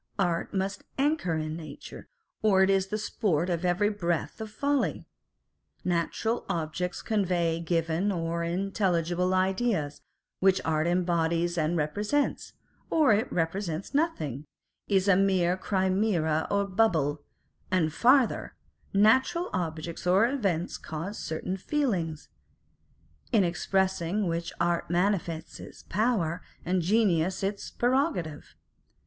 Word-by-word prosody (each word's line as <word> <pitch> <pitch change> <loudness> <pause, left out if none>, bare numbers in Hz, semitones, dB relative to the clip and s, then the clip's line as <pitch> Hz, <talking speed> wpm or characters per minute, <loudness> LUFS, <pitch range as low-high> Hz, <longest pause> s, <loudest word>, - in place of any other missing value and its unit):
Art 175 -4 0
must 195 0 -2
anchor 275 - +1
in 155 0 -3
nature, 160 -2 -9 0.3
or 195 -3 +4
it 190 - +4
is 195 -1 +2
the 210 - -2
sport 190 -5 0
of 170 0 -1
every 180 +4 +2
breath 175 -2 -2
of 220 - -5
folly. 280 +5 -1 0.8
Natural 180 +7 0
objects 175 +1 -2
convey 180 -6 +1
given 165 +3 0
or 170 -2 -2
intelligible 180 -1 0
ideas, 190 -5 0 0.4
which 190 0 +4
art 155 0 +1
embodies 170 -1 +1
and 165 +1 0
re 150 - +2
presents, 210 - -1 0.4
or 305 -8 +4
it 220 +5 0
represents 170 - -2
nothing, 155 - -1 0.4
is 195 -1 +2
a 200 - +6
mere 185 -2 +3
chimera 185 -4 +1
or 200 0 +1
bubble; 170 -8 +1 0.5
and, 165 -5 +1
farther, 255 - +3 0.4
natural 260 - +3
objects 165 -1 -3
or 190 +5 +5
events 195 - -1
cause 165 +7 -5
certain 170 +4 -3
feelings, 185 - -1 1.0
in 220 -5 +4
expressing 190 +2 0
which 170 0 -2
art 170 0 0
manifests 175 -3 -1
its - - -11
power, 185 -5 0 0.2
and 180 +1 +1
genius 185 -2 +2
its 200 +1 -2
prerogative. 245 - -1
185 Hz, 120 wpm, -28 LUFS, 165-205 Hz, 1.0 s, a